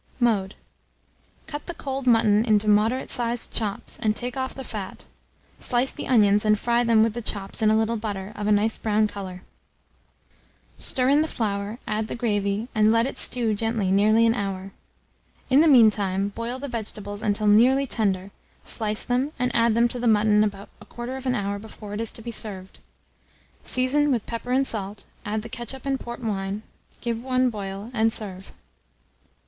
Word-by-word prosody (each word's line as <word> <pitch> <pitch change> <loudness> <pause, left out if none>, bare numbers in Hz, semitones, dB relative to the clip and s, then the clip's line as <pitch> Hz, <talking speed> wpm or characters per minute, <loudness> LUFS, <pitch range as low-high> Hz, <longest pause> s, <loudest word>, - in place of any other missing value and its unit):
Mode. 210 -6 +1 0.9
Cut 295 -2 -7
the 345 - -5
cold 270 -2 -5
mutton 220 -3 +4
into 215 -2 +2
moderate 215 +5 +2
sized 240 -2 -1
chops, 210 -3 -3
and 215 -2 +1
take 245 +1 -3
off 260 -1 -3
the 265 - -7
fat; 205 -6 -7 0.5
slice 250 +1 +1
the - - -7
onions, 210 -4 +4
and 215 -1 +3
fry 240 +2 +1
them 230 -2 +4
with 225 -1 +1
the 240 - -4
chops, 200 -1 -3
in 215 - +4
a 220 - +4
little 225 +1 0
butter, 205 -2 -5
of 210 - -3
a - - +2
nice 210 +2 +2
brown 215 0 +2
colour; 190 -3 -8 1.4
stir 255 -1 +2
in 290 +2 +5
the 315 - 0
flour, 205 -3 -3
add 215 0 -1
the - - -5
gravy, 205 -2 -1
and 215 0 +4
let 230 +1 +3
it 270 - -3
stew 235 -3 +2
gently 220 -2 -1
nearly 215 +3 +4
an 225 - +4
hour. 195 -3 -4 0.8
In 270 +3 +6
the 325 - +5
mean 240 -7 +7
time 195 -1 -1
boil 230 +4 -5
the 280 +2 -6
vegetables 210 -4 -6
until 210 0 0
nearly 245 +7 +5
tender, 200 -6 -1 0.3
slice 215 -2 0
them, 255 +5 -1
and 250 0 -1
add 230 -1 +3
them 235 +1 +4
to 245 - -5
the 240 - 0
mutton 210 -1 +4
about 200 -1 -4
1/4 255 +1 -4
hour 200 0 -2
before 210 -1 -10
it 210 - -3
is 230 - +1
to 225 - -8
be 235 - -5
served. 190 -4 -1 0.8
Season 280 +3 +1
with 235 -5 0
pepper 235 +1 -5
and 265 +2 +3
salt, 205 -4 -3 0.2
add 210 +1 -2
the - - -7
ketchup 240 +3 -6
and 270 -1 -1
port 240 +1 -8
wine, 200 -1 -3 0.4
give 230 -1 -2
one 255 0 +1
boil, 200 +1 -6
and 225 -1 +2
serve. 195 -4 -3
220 Hz, 185 wpm, -24 LUFS, 205-245 Hz, 1.4 s, mean